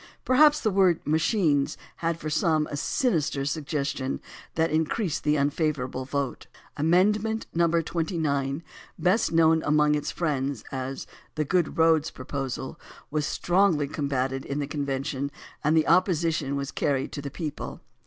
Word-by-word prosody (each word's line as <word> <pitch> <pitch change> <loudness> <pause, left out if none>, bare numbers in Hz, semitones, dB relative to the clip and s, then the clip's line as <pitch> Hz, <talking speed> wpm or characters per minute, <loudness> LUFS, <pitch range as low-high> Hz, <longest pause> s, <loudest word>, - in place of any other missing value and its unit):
Perhaps 295 +4 +5
the 215 - +1
word 185 -3 +4
"machines" 155 -2 +2 0.2
had 165 -2 -1
for 155 - -5
some 155 0 +2
a - - -2
sinister 150 - 0
suggestion 140 -2 -2 0.4
that 160 0 +1
increased 160 +3 0
the 150 0 +2
unfavorable 140 -3 -1
vote. 140 -1 -3 0.3
Amendment 210 +8 +2
No. 170 0 +3
29, 160 -3 -1 0.3
best 190 +5 +2
known 160 -1 +4
among 150 0 +3
its 150 -1 -1
friends 140 -7 -2
as 130 0 -4 0.3
the 155 -1 0
"good 175 +1 0
roads" 160 -1 +4
proposal, 130 0 -5 0.3
was 150 0 0
strongly 175 -5 +2
combated 135 -2 -2
in 140 - -4
the 145 - -1
convention 140 -1 -2 0.3
and 155 +2 +3
the 155 - +3
opposition 160 -6 +2
was 140 -1 -3
carried 135 -2 -1
to 145 - -5
the 140 - -5
people. 150 0 -6
150 Hz, 140 wpm, -26 LUFS, 140-165 Hz, 0.4 s, Perhaps